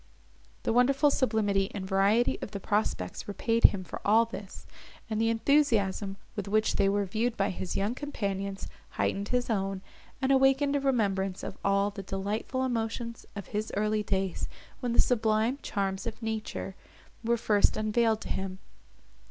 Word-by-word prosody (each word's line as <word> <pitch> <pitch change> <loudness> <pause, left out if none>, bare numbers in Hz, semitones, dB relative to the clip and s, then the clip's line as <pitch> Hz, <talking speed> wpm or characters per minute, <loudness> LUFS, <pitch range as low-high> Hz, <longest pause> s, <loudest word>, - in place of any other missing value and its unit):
The - - +1
wonderful 275 +4 +4
sublimity 210 -6 +1
and 195 -2 -4
variety 200 +5 +3
of - - -4
the 200 0 -5
prospects 195 - -1
repaid 225 +3 +2
him 190 -2 +5
for 180 - -8
all 220 +3 +5
this, 205 -4 -9 0.5
and 215 0 0
the 225 - +3
enthusiasm, 225 -6 +2 0.2
with 205 -2 -4
which 215 +2 +2
they 195 - +4
were 200 0 +1
viewed 225 +5 -1
by 195 - +1
his 185 0 -4
young 205 +4 0
companions, 200 -8 -3 0.3
heightened 200 +1 0
his 250 +1 0
own, 195 -3 -1 0.4
and 265 0 +1
awakened 270 +1 +4
a - - +3
remembrance 200 -8 0
of - - -5
all 200 +1 +2
the 200 - -6
delightful 205 +7 -2
emotions 230 -1 -3
of 200 -3 -7
his 215 +1 -2
early 215 +1 +1
days, 190 -3 -1 0.3
when 245 -3 -1
the - - +3
sublime 225 +2 +2
charms 195 -1 -2
of 230 +1 -6
nature 220 -3 -3 0.5
were 235 +1 +2
first 210 -2 +3
unveiled 220 +1 +2
to - - -7
him. 190 -1 -3
215 Hz, 160 wpm, -29 LUFS, 195-235 Hz, 0.5 s, him